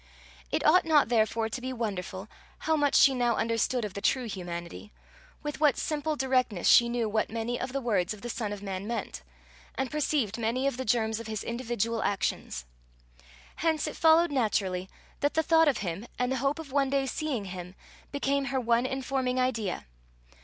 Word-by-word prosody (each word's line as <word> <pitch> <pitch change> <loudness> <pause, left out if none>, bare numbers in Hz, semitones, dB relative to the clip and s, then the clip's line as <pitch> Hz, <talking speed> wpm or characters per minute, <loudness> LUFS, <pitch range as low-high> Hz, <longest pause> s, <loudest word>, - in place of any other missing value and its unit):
It - - 0
ought 360 +4 +6
not 305 -6 +4
therefore 225 -1 +2
to 225 +3 -5
be 260 +1 -3
wonderful 195 -5 -4 0.3
how 320 - +2
much 290 -2 +2
she 275 - +7
now 240 -2 +1
understood 230 +1 0
of 205 - -6
the 200 - -6
true 255 +3 +1
humanity 175 0 -6 0.5
with 295 0 -4
what 295 -5 +4
simple 305 0 -1
directness 255 -9 +1
she 235 0 +7
knew 235 -2 0
what 215 +1 0
many 230 +2 -3
of - - -3
the 275 +1 -2
words 205 -8 +1
of 210 -2 -6
the - - -4
Son 225 -3 -3
of 205 -1 -6
Man 195 0 -4
meant, 225 - -4 0.5
and 265 - -2
perceived 285 -7 0
many 235 +4 0
of 275 -3 0
the 260 - -3
germs 220 -1 +1
of 230 - -7
his 215 -1 -4
individual 230 -2 -2
actions. - - -2 0.9
Hence 320 -2 +1
it - - -4
followed 325 +1 +5
naturally 195 -7 0 0.3
that 290 - 0
the 320 - +3
thought 325 0 +5
of 285 - +3
him, 185 +7 -4
and 250 +1 0
the 265 - 0
hope 275 +3 0
of 320 -4 -8
one 275 -1 +2
day 275 0 +1
seeing 265 -5 -2
him, 180 -1 -7 0.4
became 280 -1 0
her 270 0 -1
one 235 +1 +2
informing 260 -1 -1
idea. 230 - -1
240 Hz, 190 wpm, -29 LUFS, 215-275 Hz, 0.9 s, she